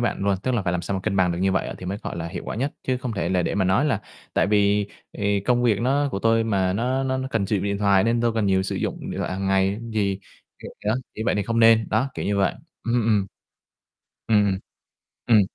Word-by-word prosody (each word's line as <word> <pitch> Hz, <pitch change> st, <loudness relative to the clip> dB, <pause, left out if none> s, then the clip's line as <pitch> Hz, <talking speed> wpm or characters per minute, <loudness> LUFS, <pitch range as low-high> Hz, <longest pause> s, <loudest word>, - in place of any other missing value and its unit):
bạn -, -, -6 dB
luôn. 100 Hz, -1 st, +3 dB
Tức 130 Hz, -, 0 dB
là 115 Hz, -, 0 dB
phải 90 Hz, -, -1 dB
làm 90 Hz, -1 st, -1 dB
sao 100 Hz, -, -3 dB
mà 95 Hz, -, -2 dB
cân 105 Hz, -1 st, -1 dB
bằng 90 Hz, -2 st, +3 dB
được 85 Hz, -, -4 dB
như 95 Hz, +1 st, +2 dB
vậy 95 Hz, -, -1 dB
thì 90 Hz, -, -8 dB
mới, 100 Hz, +2 st, -3 dB
gọi -, -, -5 dB
là, 85 Hz, 0 st, -4 dB
hiệu -, -, -6 dB
quả -, -, -5 dB
nhất, 135 Hz, +4 st, -1 dB
chứ 130 Hz, -, 0 dB
không 125 Hz, -2 st, -4 dB
thể 95 Hz, -4 st, -2 dB
là 90 Hz, -1 st, +1 dB
để -, -, -1 dB
mà 100 Hz, -1 st, +1 dB
nói 95 Hz, +10 st, +3 dB
là 120 Hz, -8 st, +1 dB, 0.3 s
tại -, -, +3 dB
vì, 105 Hz, 0 st, +3 dB, 0.3 s
ề, 100 Hz, -1 st, 0 dB
công 120 Hz, +4 st, +1 dB
việc 115 Hz, -4 st, +2 dB
nó 140 Hz, +4 st, +2 dB
của 95 Hz, -, -2 dB
tôi 115 Hz, +2 st, +2 dB
mà 95 Hz, -4 st, +1 dB
nó 125 Hz, +6 st, 0 dB
nó 130 Hz, 0 st, 0 dB
nó 130 Hz, 0 st, -3 dB
cần 110 Hz, -5 st, 0 dB
sử 105 Hz, -, +1 dB
dụng 95 Hz, -, -2 dB
điện 100 Hz, 0 st, -1 dB
thoại 100 Hz, -1 st, +4 dB
nên 115 Hz, +1 st, +2 dB
tôi 120 Hz, -1 st, +2 dB
cần 110 Hz, -2 st, 0 dB
nhiều 95 Hz, -1 st, +3 dB
sử 95 Hz, -, -3 dB
dụng -, -, -3 dB
điện -, -, -5 dB
thoại -, -, -2 dB
hàng 95 Hz, +1 st, -3 dB
ngày 95 Hz, +2 st, +2 dB
gì, 100 Hz, -3 st, 0 dB, 0.4 s
kiểu -, -, -9 dB
đó, 105 Hz, -, +2 dB, 0.2 s
như 110 Hz, -, -4 dB
vậy -, -, +2 dB
thì 105 Hz, -, 0 dB
không 115 Hz, +3 st, -1 dB
nên, 115 Hz, -1 st, +6 dB
đó, 115 Hz, +6 st, +1 dB
kiểu -, -, -4 dB
như 100 Hz, 0 st, 0 dB
vậy. 95 Hz, -3 st, +2 dB, 0.3 s
Ừm, 115 Hz, 0 st, +1 dB
ừm. 105 Hz, -3 st, +2 dB, 1.0 s
Ừm, 105 Hz, -2 st, +4 dB
ừm. 95 Hz, -2 st, 0 dB, 0.7 s
Ừm. 115 Hz, -3 st, +6 dB
105 Hz, 280 wpm, -24 LUFS, 95-115 Hz, 1.0 s, nên